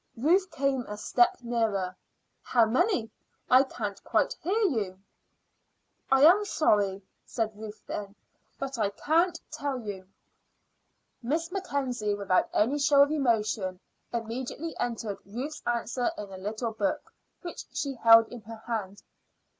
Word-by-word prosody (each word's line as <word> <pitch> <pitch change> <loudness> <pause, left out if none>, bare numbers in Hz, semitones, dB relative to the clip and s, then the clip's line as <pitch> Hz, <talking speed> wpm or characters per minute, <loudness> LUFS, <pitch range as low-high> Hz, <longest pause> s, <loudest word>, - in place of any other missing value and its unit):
Ruth 360 +10 +3
came 275 -4 0
a 210 - -6
step 240 +3 +3
nearer. 215 -6 -1 0.5
"How 235 -2 +3
many? 245 - +1 0.4
I 255 +1 +8
can't 215 -7 -4
quite - - +1
hear 375 +7 0
you." 210 - 0 1.1
"I 270 +1 +5
am 365 +7 +7
sorry," 205 - +1 0.2
said 220 -2 -3
Ruth 215 0 -9
then, 200 -1 -6 0.4
"but 270 -2 -4
I 205 -2 +2
can't 330 - +1
tell 285 -2 -3
you." 200 -5 -7 1.1
Miss 320 +8 -1
Mackenzie, 255 - -2
without 195 -2 +1
any 260 +8 +2
show 280 0 +6
of 285 - 0
emotion, 215 -9 0 0.3
immediately 245 +7 -4
entered 225 -4 -3
Ruth's 260 +9 -6
answer 240 +2 0
in 205 -2 -7
a - - -7
little 220 +4 -3
book 210 -3 -2 0.3
which 345 - -7
she 280 -2 -2
held 230 -2 +7
in 245 - -9
her 220 +1 -11
hand. 210 -4 -4
235 Hz, 135 wpm, -28 LUFS, 210-280 Hz, 1.1 s, I